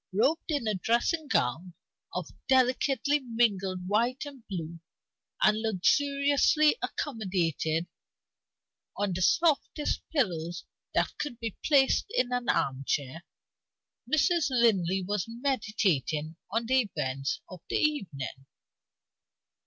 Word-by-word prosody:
Robed 260 Hz, -, +1 dB
in 290 Hz, -6 st, 0 dB
a 215 Hz, -, +1 dB
dressing 240 Hz, -, 0 dB
gown 165 Hz, -, 0 dB, 0.4 s
of -, -, -5 dB, 0.2 s
delicately 265 Hz, +2 st, +2 dB
mingled 200 Hz, -7 st, 0 dB
white 235 Hz, +7 st, +1 dB
and 280 Hz, -3 st, -10 dB
blue, 170 Hz, -3 st, -5 dB, 0.6 s
and 215 Hz, +1 st, +3 dB
luxuriously 280 Hz, -, +3 dB
accommodated 175 Hz, -, -1 dB, 1.1 s
on 200 Hz, -2 st, 0 dB
the 180 Hz, -, -3 dB
softest 305 Hz, -, +2 dB
pillows 175 Hz, -, -1 dB, 0.3 s
that -, -, +1 dB
could 245 Hz, -6 st, -4 dB
be 225 Hz, -4 st, -4 dB
placed 275 Hz, -3 st, +3 dB
in 250 Hz, 0 st, +1 dB
an 245 Hz, -1 st, -1 dB
armchair, 135 Hz, +3 st, -1 dB, 0.9 s
Mrs. 310 Hz, 0 st, +3 dB
Linley 195 Hz, -7 st, +2 dB
was 200 Hz, -1 st, -1 dB
meditating 210 Hz, -, -1 dB
on 230 Hz, +1 st, -1 dB
the 255 Hz, -2 st, +2 dB
events 135 Hz, +1 st, -2 dB
of 185 Hz, -3 st, -11 dB
the -, -, -1 dB
evening. 145 Hz, -, -2 dB
220 Hz, 105 wpm, -29 LUFS, 175-270 Hz, 1.1 s, and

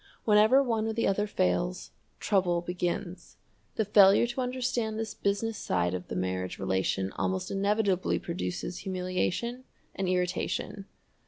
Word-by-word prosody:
Whenever 220 Hz, +5 st, +5 dB
one 225 Hz, -4 st, 0 dB
or 220 Hz, -, -1 dB
the 230 Hz, -, 0 dB
other 205 Hz, +2 st, +1 dB
fails, 90 Hz, -, -1 dB, 0.3 s
trouble 180 Hz, -4 st, +1 dB
begins. 175 Hz, 0 st, -4 dB, 0.4 s
The 220 Hz, -, +1 dB
failure 200 Hz, +1 st, +6 dB
to 240 Hz, +2 st, -3 dB
understand 250 Hz, -3 st, -1 dB
this 220 Hz, -1 st, -3 dB
business 205 Hz, +2 st, -1 dB
side 90 Hz, -1 st, 0 dB
of 90 Hz, -1 st, -5 dB
the -, -, -5 dB
marriage 90 Hz, 0 st, -2 dB
relation 95 Hz, 0 st, -1 dB
almost 95 Hz, 0 st, -1 dB
inevitably 200 Hz, -1 st, +1 dB
produces 90 Hz, -, -4 dB
humiliation 185 Hz, +6 st, -2 dB, 0.3 s
and 190 Hz, -2 st, -2 dB
irritation. 180 Hz, +2 st, -2 dB
195 Hz, 135 wpm, -29 LUFS, 170-220 Hz, 0.4 s, failure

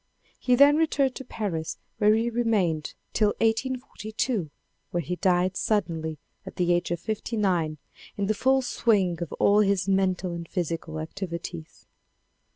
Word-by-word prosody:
He 250 Hz, -, +3 dB
then 285 Hz, +3 st, +7 dB
returned 285 Hz, -5 st, +2 dB
to -, -, -7 dB
Paris 190 Hz, -10 st, -4 dB, 0.2 s
where 210 Hz, +1 st, +5 dB
he 230 Hz, +2 st, 0 dB
remained 205 Hz, -10 st, 0 dB, 0.2 s
till 210 Hz, -1 st, +2 dB
1842, 225 Hz, -, -1 dB, 0.4 s
where 175 Hz, -, -1 dB
he 175 Hz, +2 st, -3 dB
died 185 Hz, 0 st, +2 dB
suddenly 165 Hz, -8 st, -1 dB, 0.3 s
at -, -, -10 dB
the 175 Hz, -1 st, +2 dB
age 175 Hz, 0 st, 0 dB
of 170 Hz, -1 st, -1 dB
fifty 220 Hz, +3 st, -3 dB
nine 175 Hz, -7 st, +1 dB, 0.4 s
in 200 Hz, -, 0 dB
the 215 Hz, -, +1 dB
full 265 Hz, +5 st, +2 dB
swiug 195 Hz, -8 st, +1 dB
of 170 Hz, -, -4 dB
all 205 Hz, +1 st, +4 dB
his 200 Hz, -2 st, +2 dB
mental 190 Hz, -2 st, +1 dB
and 170 Hz, -1 st, -6 dB
physical 165 Hz, -2 st, -3 dB
activities. 170 Hz, -, -6 dB
195 Hz, 150 wpm, -26 LUFS, 170-225 Hz, 0.4 s, then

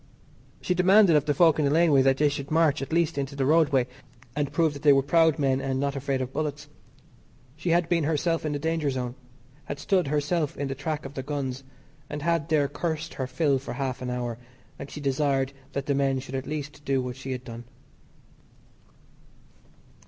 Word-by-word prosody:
She 180 Hz, -, 0 dB
demanded 185 Hz, 0 st, +5 dB
of 150 Hz, -1 st, +3 dB
the 145 Hz, -, +1 dB
folk 165 Hz, -1 st, +4 dB
in 150 Hz, -, +2 dB
the -, -, +3 dB
laneway 155 Hz, -2 st, +4 dB
that 135 Hz, 0 st, +3 dB
they 150 Hz, -, +3 dB
should 140 Hz, -1 st, -3 dB
march 155 Hz, -2 st, +2 dB
at 135 Hz, -, -5 dB
least 160 Hz, -3 st, +1 dB
into 140 Hz, 0 st, -4 dB
the 135 Hz, -1 st, 0 dB
roadway 145 Hz, -4 st, +3 dB, 0.5 s
and 145 Hz, -1 st, -1 dB
prove 160 Hz, 0 st, +2 dB
that 140 Hz, -, -9 dB
they 145 Hz, -2 st, +6 dB
were 135 Hz, 0 st, +3 dB
proud 160 Hz, +1 st, +3 dB
men 135 Hz, -2 st, +1 dB
and 135 Hz, -1 st, -2 dB
were -, -, -1 dB
not 140 Hz, 0 st, -1 dB
afraid 135 Hz, -1 st, -1 dB
of 130 Hz, +1 st, -7 dB
bullets. 150 Hz, 0 st, -3 dB, 0.9 s
She 155 Hz, +3 st, -4 dB
had 170 Hz, 0 st, +3 dB
been 170 Hz, -3 st, +1 dB
herself 165 Hz, +2 st, 0 dB
into 150 Hz, -2 st, -1 dB
the 145 Hz, -, -11 dB
danger 160 Hz, -2 st, 0 dB
zone. 125 Hz, -2 st, -3 dB, 0.5 s
Had 145 Hz, -, -5 dB
stood 180 Hz, +3 st, +1 dB
herself 150 Hz, +2 st, -1 dB
in 140 Hz, 0 st, -3 dB
the -, -, -1 dB
track 145 Hz, +2 st, -4 dB
of 135 Hz, -, -7 dB
the 135 Hz, -, -4 dB
guns, 135 Hz, -2 st, -4 dB, 0.5 s
and 145 Hz, 0 st, -5 dB
had 170 Hz, -1 st, 0 dB
there 150 Hz, -3 st, +3 dB
cursed 160 Hz, +3 st, -3 dB
her 130 Hz, -, -3 dB
fill 140 Hz, -1 st, +1 dB
for 135 Hz, -, -7 dB
half 130 Hz, -1 st, -3 dB
an 125 Hz, -, -3 dB
hour, 120 Hz, -2 st, -3 dB, 0.4 s
and 140 Hz, -, -7 dB
she -, -, -8 dB
desired 135 Hz, -1 st, 0 dB, 0.2 s
that 140 Hz, -1 st, -3 dB
the 145 Hz, -, +1 dB
men 135 Hz, -1 st, +1 dB
should 130 Hz, 0 st, -9 dB
do 135 Hz, -, -2 dB
at 130 Hz, -, -10 dB
least 150 Hz, -1 st, -5 dB
what 125 Hz, -2 st, 0 dB
she 135 Hz, 0 st, -7 dB
had 125 Hz, -1 st, -4 dB
done. 120 Hz, -1 st, -9 dB
145 Hz, 210 wpm, -26 LUFS, 135-155 Hz, 0.9 s, they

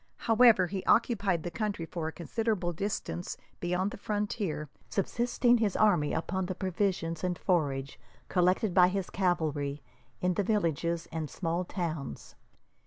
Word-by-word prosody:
However, 225 Hz, -4 st, +5 dB
he 190 Hz, +1 st, -4 dB
occupied 200 Hz, -8 st, +2 dB
the 175 Hz, -, -4 dB
country 200 Hz, -1 st, -2 dB
for 165 Hz, -1 st, -4 dB
a -, -, -3 dB
considerable 185 Hz, +1 st, -1 dB
distance 195 Hz, -1 st, -3 dB, 0.2 s
beyond 180 Hz, +3 st, 0 dB
the 250 Hz, -, -7 dB
frontier, 205 Hz, -7 st, -2 dB, 0.2 s
subsisting 240 Hz, +4 st, +2 dB
his 210 Hz, -4 st, +1 dB
army 180 Hz, -9 st, +3 dB
upon 190 Hz, +3 st, -1 dB
the 185 Hz, -, -3 dB
provisions 180 Hz, -3 st, -1 dB
and 180 Hz, -1 st, 0 dB
forage 140 Hz, -7 st, 0 dB, 0.3 s
collected 185 Hz, +2 st, +2 dB
by 180 Hz, -1 st, +7 dB
his 190 Hz, 0 st, -2 dB
cavalry 150 Hz, -6 st, 0 dB, 0.4 s
in 180 Hz, 0 st, +1 dB
the 200 Hz, -, 0 dB
villages 170 Hz, -5 st, 0 dB
and 160 Hz, -2 st, -3 dB
small 175 Hz, 0 st, -2 dB
towns. 160 Hz, -, -4 dB
180 Hz, 140 wpm, -30 LUFS, 165-205 Hz, 0.4 s, by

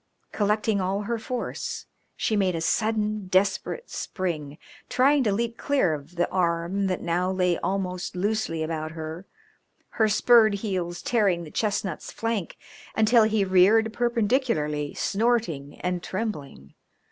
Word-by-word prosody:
Collecting 210 Hz, 0 st, +1 dB
all 190 Hz, +2 st, -1 dB
her 230 Hz, +2 st, -2 dB
force 250 Hz, +2 st, -4 dB, 0.3 s
she 220 Hz, -, 0 dB
made 190 Hz, -4 st, +1 dB
a 165 Hz, -, -2 dB
sudden 215 Hz, +1 st, 0 dB
desperate 195 Hz, -, 0 dB
spring, 155 Hz, -6 st, -4 dB, 0.3 s
trying 275 Hz, +3 st, +4 dB
to 215 Hz, -, +2 dB
leap 230 Hz, +3 st, -1 dB
clear 270 Hz, -, +1 dB
of 150 Hz, +4 st, -8 dB
the 175 Hz, 0 st, +1 dB
arm 175 Hz, +2 st, 0 dB
that 185 Hz, -1 st, -2 dB
now 175 Hz, +2 st, 0 dB
lay 180 Hz, -2 st, +1 dB
almost 185 Hz, -2 st, -2 dB
loosely 190 Hz, -4 st, -1 dB
about 155 Hz, 0 st, -3 dB
her, 160 Hz, +3 st, -7 dB, 0.6 s
her 220 Hz, -1 st, +2 dB
spurred 215 Hz, 0 st, +5 dB
heels 185 Hz, -4 st, -3 dB
tearing 200 Hz, -7 st, +2 dB
the 155 Hz, -, -10 dB
chestnut's 205 Hz, -5 st, -2 dB
flank 225 Hz, -6 st, -3 dB, 0.4 s
until 220 Hz, +1 st, +5 dB
he 215 Hz, -2 st, +2 dB
reared 205 Hz, +4 st, +4 dB
perpendicularly, 230 Hz, -, 0 dB
snorting 200 Hz, -, 0 dB
and 180 Hz, -1 st, -1 dB
trembling. 150 Hz, -, -5 dB
195 Hz, 135 wpm, -26 LUFS, 170-220 Hz, 0.6 s, spurred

